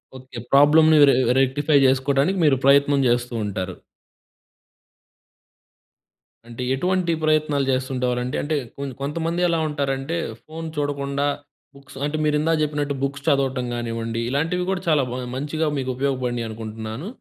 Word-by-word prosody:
Okay. 130 -2 -9
ప్రాబ్లంని 155 +3 +6
రె - - +4 0.2
rectify 145 +3 +2
చేసుకోవడానికి 140 +7 +1
మీరు 140 -3 +4
ప్రయత్నం 140 0 +5
చేస్తూ 120 0 0
ఉంటారు. 95 -2 -4 2.7
అంటే, 120 +1 -6
ఎటువంటి 180 +4 0
ప్రయత్నాలు 155 -2 +1
చేస్తుండేవారండి? 125 -1 -1
అంటే, 155 +1 -1 0.2
కొన్ 140 -1 -4
కొంతమంది 165 +4 -2
ఎలా 165 - +1
ఉంటారంటే, 140 +2 -2 0.3
ఫోన్ 160 +1 -8
చూడకుండా, 140 -1 -1 0.5
బుక్స్ 140 0 -15
అంటే, 150 +1 -2
మీరిందాక 150 +2 +1
చెప్పినట్టు 145 -1 -2
బుక్స్ 140 0 -3
చదవటం 135 -4 +1
గానివ్వండి, 115 -1 -3
ఇలాంటివి 165 +6 0
గూడా 190 -1 -2
చాలా 150 -4 +3
బా 125 - -4 0.2
మంచిగా 155 +2 -1
మీకు 130 -1 -2
ఉపయోగపడినియి 125 -3 -1
అనుకుంటన్నాను. 110 - -6
140 Hz, 120 wpm, -22 LUFS, 130-150 Hz, 2.7 s, ప్రాబ్లంని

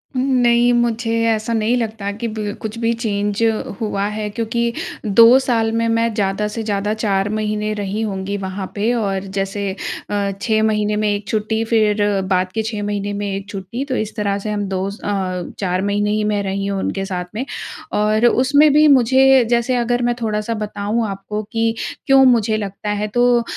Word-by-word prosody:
उम्म, 265 +2 0
नहीं 240 0 +4
मुझे 235 -1 0 0.2
ऐसा 220 +1 0
नहीं 225 +2 +1
लगता 215 -3 -3
कि 220 +3 -4
बिल 215 -2 -4
कुछ 220 +1 -5
भी 230 0 +1
चेंज 205 0 -1 0.4
हुआ 200 -2 -1
है 215 -1 -3
क्योंकि 235 +2 -1 0.3
2 230 +5 +7
साल 230 -4 +1
में 230 0 0
मैं 230 0 +1
ज़्यादा 205 0 0
से 220 +2 -4
ज़्यादा 205 0 -1
4 200 -2 0
महीने 215 0 -1
रही 205 0 -3
होंगी 200 -2 -3
वहाँ 190 0 -4
पे 215 +4 +1
और 195 -5 -1
जैसे 195 +1 -2 0.4
अ, 200 -1 0
6 220 0 +1
महीने 210 -1 +1
में 210 0 0
1 205 0 -2
छुट्टी 220 +2 -1
फिर 215 -2 +2 0.3
बाद 185 0 +1
के 220 - -1
6 215 -2 -3
महीने 205 0 -2
में 205 0 -3
1 195 0 -6
छुट्टी, 200 +6 -5
तो 265 -2 -2
इस 215 -1 -3
तरह 200 -2 0
से 210 +1 -4
हम 205 -1 -2
2 190 0 -1
अ, 190 -3 -3
4 185 -1 0
महीने 205 +1 0
ही 215 0 0
मैं 210 -1 0
रही 195 0 -2
हूँ 200 -1 -2
उनके 195 0 -2
साथ 180 -2 -3
में। 245 +5 -2 0.5
और 215 +2 +2
उसमें 285 +5 +4
भी 300 +1 +6
मुझे 265 0 +5
जैसे 240 +1 +2
अगर 245 0 0
मैं 240 0 +1
थोड़ा-सा 215 0 -1
बताऊँ 215 +1 -2
आपको 195 +2 -4
कि 225 -1 0 0.3
क्यों 270 -1 +6
मुझे 225 -4 +3
लगता 205 0 -5
है? 210 0 -1
तो 240 +2 +3
215 Hz, 190 wpm, -19 LUFS, 200-230 Hz, 0.5 s, 2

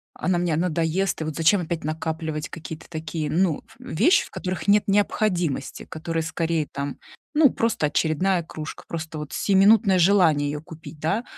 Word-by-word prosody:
она 185 -1 0
мне 175 -3 0
надоест, 170 +2 0
и - - 0
вот 155 -1 -4
зачем 170 +4 +3
опять 170 -1 -4
накапливать 155 0 -3
какие-то 160 0 -9
такие, 160 -1 -4
ну, 165 0 +1
ф - - -20
вещи, 230 - +2
в - - -15
которых 185 +2 -4
нет 205 +1 +5
необходимости? 180 -8 0
Которые, 165 0 -3
скорее, 160 -1 -1
там, 140 -1 -4 0.4
ну, 295 -4 +5
просто 225 -10 0
очередная 170 +4 +1
кружка, 155 -1 -8
просто 160 -1 -5
вот 150 0 -7
сиюминутное 200 0 +4
желание 170 -6 +4
ее 150 - -5
купить, 160 -1 -11
да? 195 +10 0
165 Hz, 165 wpm, -24 LUFS, 155-190 Hz, 0.4 s, нет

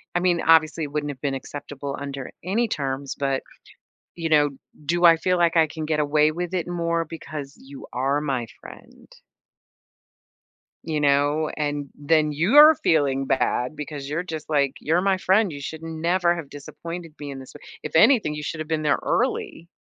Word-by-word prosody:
I - - +3
mean, 175 -2 +1
obviously, 160 0 +4
it 145 - -5
wouldn't 145 0 -2
have 130 -2 -12
been 140 -2 -1
acceptable 140 +1 -6
under 140 -2 -6
any 220 +7 0
terms, 135 -4 -3
but, 135 -1 -1 0.7
you 165 -2 -3
know, 145 -2 +4 0.3
do 175 +3 0
I 165 -1 +8
feel 180 +2 +1
like 170 0 +3
I 160 - +6
can 155 0 -6
get 155 -1 0
away 150 +1 +3
with 175 +2 -4
it 175 -2 -1
more 170 -1 -1
because 155 -3 -8
you 140 +1 -12
are 135 +3 0
my 130 -5 -2 0.2
friend? - - -14 1.7
You 155 -2 -2
know? 145 +2 +2
And 145 -2 -2
then 150 +1 +2
you're 280 - +7
feeling 140 - +1
bad, 130 +1 0
because 145 -2 -6
you're 160 +4 -2
just 160 -3 -7
like, 140 -3 +2
"You're 165 +4 +1
my 195 0 +2
friend, 190 0 +2
you 140 - -8
should 160 +3 -7
never 170 +2 0
have 165 -5 -7
disappointed 165 +3 -8
me 145 -1 -6
in 135 - -7
this 130 - -12
way 145 - -13 0.2
if 150 +1 -6
anything, 210 - +5
you 150 - -6
should 155 - -4
have 155 - -5
been 160 -1 -1
there 150 - +2
early 230 -8 -1
155 Hz, 185 wpm, -24 LUFS, 145-170 Hz, 1.7 s, I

